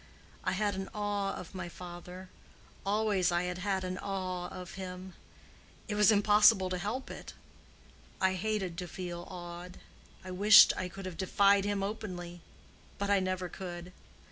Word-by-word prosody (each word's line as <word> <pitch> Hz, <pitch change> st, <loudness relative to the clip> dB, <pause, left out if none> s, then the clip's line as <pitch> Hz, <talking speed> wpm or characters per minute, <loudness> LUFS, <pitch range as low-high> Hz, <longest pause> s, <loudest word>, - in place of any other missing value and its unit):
I 185 Hz, -, 0 dB
had 205 Hz, +1 st, 0 dB
an 190 Hz, 0 st, -5 dB
awe 205 Hz, -1 st, -1 dB
of 180 Hz, -, -9 dB
my 185 Hz, -2 st, -5 dB
father—always 185 Hz, +3 st, -3 dB
I 175 Hz, +1 st, +1 dB
had 180 Hz, 0 st, -3 dB
had 190 Hz, 0 st, -1 dB
an 185 Hz, +1 st, -3 dB
awe 185 Hz, -2 st, -3 dB
of 180 Hz, -1 st, -8 dB
him: 185 Hz, -1 st, -7 dB, 0.7 s
it 215 Hz, -, -2 dB
was 210 Hz, +1 st, +5 dB
impossible 205 Hz, -2 st, +5 dB
to 180 Hz, -, -1 dB
help 225 Hz, +8 st, -3 dB
it. -, -, -9 dB, 0.9 s
I 190 Hz, 0 st, +3 dB
hated 190 Hz, -3 st, -2 dB
to 180 Hz, -, -4 dB
feel 175 Hz, -1 st, -6 dB
awed—I 180 Hz, +1 st, -10 dB
wished 205 Hz, +3 st, +8 dB
I 180 Hz, -, -3 dB
could 195 Hz, +2 st, -9 dB
have 185 Hz, -2 st, -6 dB
defied 200 Hz, +1 st, +4 dB
him 205 Hz, -1 st, 0 dB
openly; 180 Hz, -4 st, -5 dB, 0.6 s
but 200 Hz, 0 st, -1 dB
I 200 Hz, -, +5 dB
never 185 Hz, -1 st, -2 dB
could. 175 Hz, 0 st, -7 dB
185 Hz, 150 wpm, -31 LUFS, 180-200 Hz, 0.9 s, wished